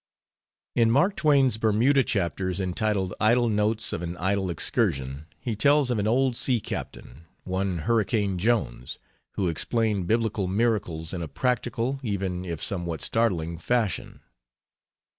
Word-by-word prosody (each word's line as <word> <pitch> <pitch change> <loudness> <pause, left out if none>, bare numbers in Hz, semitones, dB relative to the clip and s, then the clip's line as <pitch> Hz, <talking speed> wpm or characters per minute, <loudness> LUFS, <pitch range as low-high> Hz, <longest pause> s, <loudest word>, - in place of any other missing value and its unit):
In 115 -1 +3
Mark 175 - +3
Twain's 135 -7 +3
Bermuda 115 +6 +3
chapters 95 -4 -1
entitled 95 0 -1
Idle 120 +2 +3
Notes 105 +1 0
of 85 - -3
an 85 0 -5
Idle 95 +1 0
Excursion 70 -3 -1
he 115 -3 -3
tells 140 +4 +3
of 115 - 0
an 105 - 0
old 130 +2 +2
sea 125 0 +1
captain, 80 -6 -7 0.2
one 95 -1 -1
Hurricane 105 0 0
Jones, 100 - -1 0.4
who 95 - -1
explained 105 +3 0
biblical 110 -2 0
miracles 95 -6 -1
in 90 - -3
a 80 - -4
practical, 125 - -1
even 95 -6 -3
if 85 -3 -5
somewhat 85 -4 -2
startling, 85 -8 0
fashion. 115 +1 -1
105 Hz, 135 wpm, -26 LUFS, 90-115 Hz, 0.4 s, In